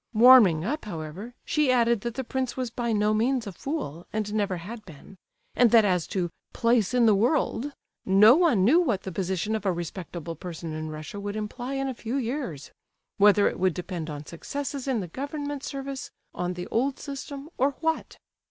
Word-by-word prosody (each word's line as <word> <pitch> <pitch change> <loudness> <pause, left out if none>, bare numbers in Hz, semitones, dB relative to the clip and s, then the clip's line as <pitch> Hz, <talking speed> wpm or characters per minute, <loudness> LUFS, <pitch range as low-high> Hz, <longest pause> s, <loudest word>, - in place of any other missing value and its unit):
Warming 215 -9 +7
up, 295 +6 -2
however, 185 +6 -7
she 300 -4 +2
added 235 -3 +3
that 235 0 -4
the 265 - -2
prince 260 0 -3
was 255 -3 -2
by 235 -1 -2
no 210 0 +2
means 240 +3 +1
a 200 - -5
fool, 180 - -5
and 215 -1 -2
never 200 -4 0
had 215 +6 -8
been; 165 +2 -14 0.4
and 245 -1 +5
that 225 -1 +6
as 180 -4 +1
to 175 -3 -2 0.2
"place 230 -1 +2
in 245 -2 +5
the 220 - +6
world," 255 +4 +1 0.3
no 210 +5 +7
one 300 - +3
knew 300 +10 +6
what 240 - 0
the 190 - -5
position 190 +3 -1
of 215 - -3
a 195 - +2
respectable 170 -1 -5
person 165 -1 -7
in 155 0 -4
Russia 155 +6 -7
would 205 +1 -4
imply 240 +5 -4
in 270 0 -1
a 265 - -2
few 235 +1 -5
years—whether 210 - 0
it - - -3
would 185 -2 +2
depend 175 -3 -5
on 150 0 -6
successes 280 - -5
in 250 -5 +1
the 180 - -5
government 285 - -5
service, 275 -1 -5 0.2
on 180 0 -2
the 180 0 -5
old 265 +4 +1
system, 280 0 -7
or 275 +2 +3
what. 320 0 -1
220 Hz, 190 wpm, -26 LUFS, 180-265 Hz, 0.4 s, Warming